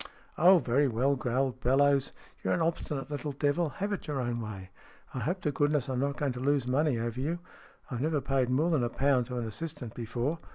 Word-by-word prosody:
"Oh, 180 +4 +7
very 140 -1 +2
well," 130 +4 +2
growled 130 +1 -1
Bellowes. 135 +2 +3 0.3
"You're - - +2
an 175 - -1
obstinate 150 -4 -2
little 145 0 -3
devil. 145 +4 +1
Have 200 +7 -3
it 200 - -5
your 145 -3 -2
own 120 -1 -2
way. 95 -4 -7 0.4
I 130 - -3
hope 175 - -2
to 150 - 0
goodness 145 -1 +1
I'm 130 -1 -1
not 140 +1 -1
going 145 -3 0
to 125 - -6
lose 140 0 +1
money 135 0 +2
over 115 +2 -3
you. 160 +5 -1 0.5
I've 120 -1 -3
never 155 0 +1
paid 135 -2 0
more 150 +7 +2
than 150 -7 +2
a 120 - 0
pound 130 -1 +2
to 125 -1 -4
an 120 - -2
assistant 125 +1 -6
before. 120 +7 -2
135 Hz, 215 wpm, -30 LUFS, 125-150 Hz, 0.5 s, Oh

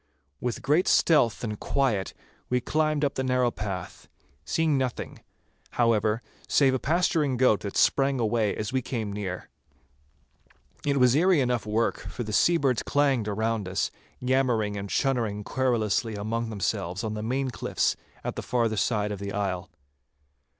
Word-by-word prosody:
With 125 +1 -3
great 150 +7 +2
stealth 125 -10 +3
and 105 -3 -3
quiet 120 -9 0 0.3
we 125 - +2
climbed 155 +2 +1
up 140 - -1
the 130 - -2
narrow 125 -1 +2
path, 95 -4 -6 0.4
seeing 155 - +1
nothing, 130 -2 -3 0.5
however, 115 -1 +2 0.2
save 135 -2 +4
a 130 - 0
pasturing 155 -4 +1
goat 125 -4 +4
that 100 - -5
sprang 135 -1 +3
away 110 -2 +1
as 110 +4 -4
we 130 - +1
came 110 -5 -4
near. 95 -3 -5 1.4
It 140 -1 +1
was 125 -2 +5
eerie 175 +3 +4
enough 125 -4 0
work, 110 +2 0
for 120 - -6
the 105 -1 -5
seabirds 140 -4 +3
clanged 140 -6 +1
around 110 0 -1
us, 95 - -1 0.3
yammering 125 -5 +1
and 100 0 -5
chunnering 115 -6 0
querulously 115 -3 0
among 115 +3 -2
themselves 95 -2 -2
on 110 -1 -2
the 105 - -4
main 130 +4 -1
cliffs - - 0 0.3
at - - -3
the - - -4
farther 115 -3 0
side 105 -1 0
of 100 - -4
the 100 0 -4
isle. 95 -3 -2
120 Hz, 155 wpm, -27 LUFS, 105-135 Hz, 1.4 s, was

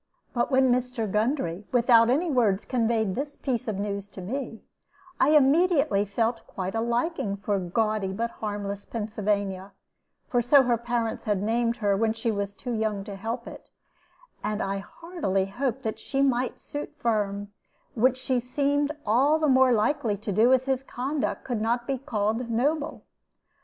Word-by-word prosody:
But 240 -2 0
when 260 -2 +4
Mr. 250 -2 0
Gundry, 210 - -1
without 235 -2 +5
any 310 +6 +2
words, 220 -7 +2
conveyed 225 -5 +1
this 285 +5 -4
piece 255 -2 -2
of 215 -3 -2
news 200 0 -3
to 200 - -11
me, 230 +3 -5 0.6
I 270 - +4
immediately 290 - +3
felt 225 +3 -1
quite 190 0 -4
a 225 - 0
liking 235 - -1
for 200 0 -1
gaudy 205 +2 0
but 230 +4 -2
harmless 205 -1 -4
Pennsylvania 205 -3 -2 0.5
for 245 - +1
so 265 +3 +6
her 245 -1 +2
parents 235 -1 -2
had 205 -2 0
named 230 +2 +1
her 205 -3 +1
when 220 +2 +1
she 225 +1 -1
was 200 -1 -3
too 245 - -6
young 215 -3 -1
to 200 -1 -7
help 230 +5 -4
it; - - -11 0.7
and 215 0 -1
I 195 -1 -1
heartily 200 - -2
hoped 255 +5 -3
that 220 -2 -3
she 275 0 0
might 255 -2 0
suit 290 - -6
Firm, 205 -3 -1 0.4
which 255 +2 +3
she 260 -1 0
seemed 285 +4 0
all 265 +8 +4
the 310 -1 +1
more 260 -1 +5
likely 230 -1 +1
to 210 +1 -4
do 220 +6 +4
as 260 0 +4
his 265 -1 0
conduct 270 +2 -3
could 240 -4 -2
not 240 +2 0
be 270 0 -2
called 230 -2 -1
noble. 290 +7 -1
230 Hz, 170 wpm, -26 LUFS, 205-260 Hz, 0.7 s, so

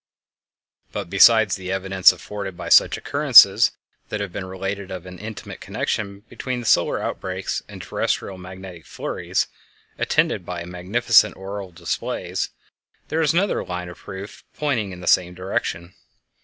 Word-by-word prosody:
But - - -5
besides 110 +1 +6
the 95 -1 -6
evidence 95 -1 +4
afforded 100 -3 -7
by - - -6
such - - +6
occurrences - - +6 0.4
as 110 - -3
have 100 -2 -4
been 95 - -5
related 95 +1 -5
of 95 -1 -7
an 90 0 -10
intimate 110 -1 -8
connection 100 -2 -3
between 125 +3 -5
solar 85 -6 +3
outbreaks 95 0 -3
and - - -10
terrestial 95 -2 -2
magnetic 90 -2 -10
flurries, - - -2 0.5
attended - - +1
by 85 -1 -6
magnificent 105 +4 +3
auroral 95 0 -6
displays, 85 0 -3 0.6
there 160 +1 0
is 155 -2 +2
another 190 +4 +1
line 90 0 -5
of 85 - -11
proof 95 +2 -9
pointing 125 -10 -1
in 90 -1 -9
the - - -8
same 90 0 +3
direction. 90 -1 -3
95 Hz, 140 wpm, -22 LUFS, 90-105 Hz, 0.6 s, besides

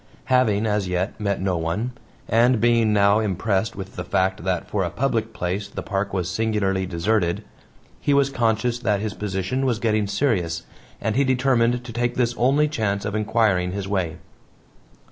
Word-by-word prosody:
Having, 115 -4 +3
as 105 -3 0
yet, 90 +2 -1
met 100 -1 0
no 95 -1 0
one, 85 +10 -2 0.4
and 120 +2 +4
being 115 -1 +3
now 100 0 +4
impressed 100 0 0
with 95 -1 -8
the - - -3
fact 95 0 0
that 90 -2 -1
for 100 -2 -1
a 85 - -1
public 115 +2 -1
place 95 +2 -3
the 100 - -6
park 100 0 -2
was 90 -3 -1
singularly 95 -2 0
deserted, 85 0 0 0.6
he - - 0
was 140 -1 +3
conscious 120 0 +1
that 105 -5 +1
his 105 0 -3
position 100 +5 -2
was 125 -4 +1
getting 110 -2 +1
serious, 100 - 0 0.4
and 110 - -1
he 140 - +4
determined 125 -2 +2
to 120 - -8
take 120 +1 -1
this 120 -1 +1
only 140 +5 +3
chance 105 -9 -1
of 105 - -3
inquiring 105 -4 +1
his 100 -1 -4
way. 95 -5 -1
105 Hz, 175 wpm, -23 LUFS, 95-120 Hz, 0.6 s, and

